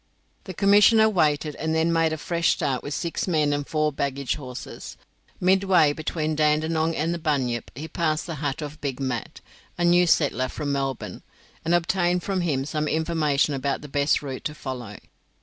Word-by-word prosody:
The 185 Hz, -, -7 dB
commissioner 210 Hz, +3 st, +6 dB
waited, 155 Hz, -6 st, +1 dB
and 160 Hz, 0 st, -1 dB
then 165 Hz, +1 st, +2 dB
made 165 Hz, -1 st, +2 dB
a 160 Hz, -, -2 dB
fresh 170 Hz, +1 st, 0 dB
start 135 Hz, -3 st, -1 dB
with 145 Hz, 0 st, -5 dB
six 170 Hz, +4 st, -3 dB
men 155 Hz, -4 st, +2 dB
and 145 Hz, 0 st, -2 dB
four 155 Hz, -1 st, 0 dB
baggage 140 Hz, -2 st, -2 dB
horses. 130 Hz, -4 st, -8 dB, 0.4 s
Midway 185 Hz, -4 st, +4 dB
between 155 Hz, 0 st, -2 dB
Dandenong 155 Hz, +2 st, +1 dB
and 165 Hz, +3 st, 0 dB
the 170 Hz, -, -4 dB
Bunyip 130 Hz, -7 st, -1 dB
he 150 Hz, +5 st, -6 dB
passed 160 Hz, -2 st, -1 dB
the 170 Hz, -, -5 dB
hut 145 Hz, +1 st, -2 dB
of 150 Hz, +1 st, -8 dB
Big 135 Hz, -3 st, -3 dB
Mat, 130 Hz, -4 st, -4 dB, 0.4 s
a 175 Hz, -, +1 dB
new 175 Hz, +1 st, +5 dB
settler 140 Hz, -5 st, +2 dB
from 145 Hz, -2 st, -4 dB
Melbourne, 135 Hz, -2 st, -3 dB, 0.4 s
and 165 Hz, +2 st, +2 dB
obtained 175 Hz, +1 st, +1 dB
from 195 Hz, -2 st, -1 dB
him 140 Hz, -6 st, 0 dB
some 150 Hz, +1 st, -2 dB
information 155 Hz, -2 st, +1 dB
about 140 Hz, 0 st, -2 dB
the -, -, -7 dB
best 145 Hz, +1 st, +1 dB
route 135 Hz, -2 st, -6 dB
to 150 Hz, -, -3 dB
follow. 125 Hz, -7 st, -6 dB
155 Hz, 180 wpm, -24 LUFS, 140-170 Hz, 0.4 s, commissioner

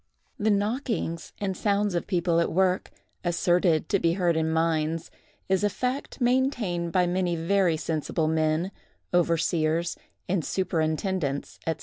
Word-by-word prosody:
The 215 Hz, +1 st, +2 dB
knockings 205 Hz, -5 st, -1 dB
and 195 Hz, -2 st, -2 dB
sounds 205 Hz, 0 st, +1 dB
of 175 Hz, -, -2 dB
people 175 Hz, -2 st, +1 dB
at 170 Hz, -, +1 dB
work, 185 Hz, +1 st, +1 dB, 0.3 s
asserted 175 Hz, -2 st, +2 dB
to 200 Hz, -, +2 dB
be 165 Hz, -1 st, +2 dB
heard 175 Hz, -2 st, +1 dB
in 160 Hz, 0 st, +1 dB
mines, 160 Hz, 0 st, 0 dB, 0.4 s
is 190 Hz, +1 st, +1 dB
a 205 Hz, -, +3 dB
fact 255 Hz, +8 st, -3 dB
maintained 240 Hz, -9 st, +1 dB
by 180 Hz, +1 st, +3 dB
many 175 Hz, 0 st, 0 dB
very 170 Hz, 0 st, +2 dB
sensible 155 Hz, 0 st, -1 dB
men, 160 Hz, +3 st, +1 dB, 0.4 s
overseers, 170 Hz, -1 st, +1 dB, 0.3 s
and 185 Hz, -3 st, 0 dB
superintendents, 160 Hz, -4 st, -1 dB
&c. 160 Hz, -, +1 dB
175 Hz, 135 wpm, -26 LUFS, 160-195 Hz, 0.4 s, a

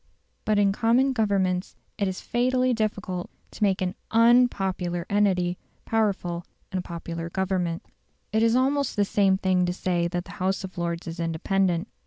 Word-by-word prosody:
But 215 Hz, -1 st, +2 dB
in 200 Hz, -1 st, +4 dB
common 240 Hz, +6 st, +2 dB
Governments 195 Hz, -5 st, 0 dB, 0.2 s
it 200 Hz, -, +1 dB
is 190 Hz, 0 st, -4 dB
fatally 255 Hz, +1 st, +1 dB
difficult 205 Hz, -5 st, -2 dB, 0.2 s
to -, -, -13 dB
make 195 Hz, -2 st, +2 dB
an 180 Hz, 0 st, -1 dB, 0.2 s
UNpopular 195 Hz, -7 st, +3 dB
entity 185 Hz, -3 st, +2 dB, 0.3 s
powerful 195 Hz, -6 st, 0 dB, 0.3 s
in 190 Hz, -, -1 dB
a -, -, -2 dB
popular 170 Hz, -1 st, -6 dB
Government. 180 Hz, -2 st, -1 dB, 0.5 s
It 220 Hz, -, +3 dB
is 230 Hz, +1 st, +4 dB
almost 275 Hz, +2 st, +1 dB
the 205 Hz, -, +2 dB
same 195 Hz, -1 st, +3 dB
thing 185 Hz, -1 st, +2 dB
to 175 Hz, -, 0 dB
say 175 Hz, -2 st, 0 dB
that 175 Hz, 0 st, -3 dB
the 195 Hz, -, -11 dB
House 190 Hz, +1 st, 0 dB
of 185 Hz, -2 st, -7 dB
Lords 170 Hz, 0 st, -2 dB
is 165 Hz, +1 st, -6 dB
independent. 170 Hz, +2 st, 0 dB
190 Hz, 165 wpm, -26 LUFS, 175-215 Hz, 0.5 s, in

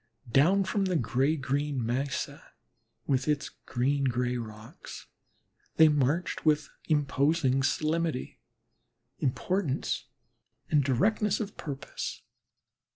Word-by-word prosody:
Down 175 Hz, +10 st, +5 dB
from 195 Hz, +1 st, 0 dB
the 185 Hz, -1 st, 0 dB
gray 130 Hz, +3 st, +2 dB
green 140 Hz, -2 st, -1 dB
mesa 130 Hz, +4 st, -3 dB, 0.5 s
with 130 Hz, -2 st, +1 dB
its 150 Hz, -1 st, 0 dB, 0.2 s
green 135 Hz, +3 st, +1 dB
gray 125 Hz, 0 st, 0 dB
rocks, 110 Hz, -2 st, -8 dB, 0.7 s
they 160 Hz, -1 st, +7 dB
marched 150 Hz, +4 st, 0 dB
with 155 Hz, -1 st, +2 dB, 0.2 s
imposing 140 Hz, -2 st, +2 dB
solemnity, 155 Hz, 0 st, -1 dB, 0.8 s
importance, 150 Hz, +2 st, -1 dB, 0.7 s
and 150 Hz, -2 st, +4 dB
directness 205 Hz, -, +2 dB
of 210 Hz, -3 st, -4 dB
purpose. 140 Hz, -4 st, -6 dB
145 Hz, 95 wpm, -29 LUFS, 130-160 Hz, 0.8 s, they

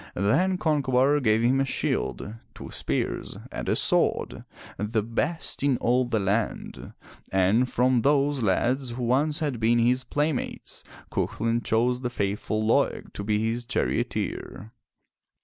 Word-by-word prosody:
Then 170 Hz, -, +2 dB
Concobar 145 Hz, -3 st, +2 dB
gave 110 Hz, -2 st, +2 dB
him 130 Hz, +3 st, +3 dB
a -, -, +1 dB
shield, 105 Hz, -4 st, -2 dB, 0.2 s
two -, -, -9 dB
spears -, -, -2 dB
and -, -, -4 dB
a -, -, +2 dB
sword, -, -, +1 dB, 0.3 s
the 105 Hz, +1 st, -1 dB
best 150 Hz, +9 st, -2 dB
in 140 Hz, -2 st, +2 dB
all 125 Hz, +2 st, +2 dB
the 115 Hz, -2 st, 0 dB
land, 100 Hz, +3 st, -2 dB, 0.4 s
and 95 Hz, +7 st, +3 dB
from 125 Hz, -1 st, +2 dB
those 140 Hz, +1 st, +2 dB
lads 120 Hz, +5 st, 0 dB
who 125 Hz, +1 st, -4 dB
once 145 Hz, +6 st, +1 dB
had 140 Hz, -6 st, -1 dB
been 115 Hz, +1 st, +3 dB
his 125 Hz, +2 st, +2 dB
playmates 145 Hz, -1 st, -3 dB, 0.3 s
Cuchulain 115 Hz, +1 st, -1 dB
chose 125 Hz, +3 st, +1 dB
the 125 Hz, -, -2 dB
faithful 105 Hz, 0 st, -2 dB
Laeg 110 Hz, -, +1 dB
to 100 Hz, -, -5 dB
be 105 Hz, +1 st, 0 dB
his 120 Hz, +2 st, -2 dB
charioteer. 110 Hz, -3 st, -3 dB
120 Hz, 140 wpm, -26 LUFS, 110-135 Hz, 0.4 s, him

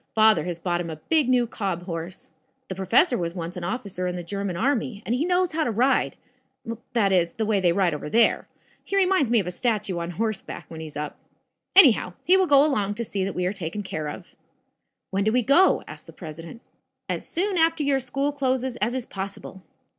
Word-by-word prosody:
Father 220 Hz, -2 st, +5 dB
has 175 Hz, -2 st, -3 dB
bought 175 Hz, 0 st, -1 dB
him 170 Hz, -, -5 dB
a 160 Hz, -, -5 dB
big 290 Hz, -, +1 dB
new 250 Hz, -1 st, +3 dB
cob 195 Hz, -6 st, -3 dB
horse. 170 Hz, -1 st, -7 dB, 0.4 s
The -, -, -2 dB
professor 225 Hz, -, +2 dB
was 170 Hz, 0 st, -3 dB
once 170 Hz, +1 st, -5 dB
an 180 Hz, -, -6 dB
officer 185 Hz, -2 st, -3 dB
in 180 Hz, -, -3 dB
the 175 Hz, -, -5 dB
German 195 Hz, 0 st, -4 dB
army, 230 Hz, -2 st, -1 dB
and 230 Hz, -, -1 dB
he 265 Hz, +6 st, 0 dB
knows 360 Hz, 0 st, +1 dB
how 315 Hz, 0 st, 0 dB
to -, -, -1 dB
ride 245 Hz, +5 st, +1 dB, 0.8 s
that 210 Hz, -5 st, +2 dB
is, 170 Hz, -3 st, +2 dB
the 220 Hz, -, -2 dB
way 210 Hz, -2 st, +2 dB
they 180 Hz, -2 st, +3 dB
ride 180 Hz, -2 st, +2 dB
over 150 Hz, 0 st, -5 dB
there. 230 Hz, +5 st, +3 dB, 0.4 s
He 395 Hz, -, -4 dB
reminds 370 Hz, -, +3 dB
me 235 Hz, -, +3 dB
of 195 Hz, -, -2 dB
a 180 Hz, -, -3 dB
statue 200 Hz, -3 st, -1 dB
on 170 Hz, 0 st, -4 dB
horseback, 215 Hz, +3 st, -4 dB
when 160 Hz, -, -8 dB
he's 155 Hz, -2 st, -8 dB
up. 150 Hz, 0 st, -5 dB, 0.6 s
Anyhow, 260 Hz, -, +6 dB
he 365 Hz, -, +6 dB
will 380 Hz, -1 st, +3 dB
go 285 Hz, -1 st, +6 dB
along 205 Hz, -9 st, 0 dB
to 235 Hz, +2 st, -3 dB
see 200 Hz, -2 st, -2 dB
that 195 Hz, -, -3 dB
we 180 Hz, -, -1 dB
are 185 Hz, -, 0 dB
taken 195 Hz, +1 st, -4 dB
care 155 Hz, -5 st, -4 dB
of." -, -, -10 dB, 0.8 s
"When 195 Hz, +1 st, 0 dB
do 215 Hz, -, +2 dB
we 250 Hz, +1 st, +2 dB
go?" 310 Hz, -, +4 dB
asked -, -, -11 dB
the -, -, -12 dB
president. 165 Hz, +6 st, -9 dB, 0.5 s
"As -, -, -4 dB
soon 370 Hz, +1 st, 0 dB
after 325 Hz, -1 st, +2 dB
your 280 Hz, -1 st, +2 dB
school 275 Hz, +3 st, -1 dB
closes 260 Hz, -3 st, -1 dB
as 235 Hz, +4 st, -1 dB
is 255 Hz, -2 st, -3 dB
possible." 195 Hz, 0 st, -7 dB
210 Hz, 220 wpm, -25 LUFS, 180-260 Hz, 0.8 s, Anyhow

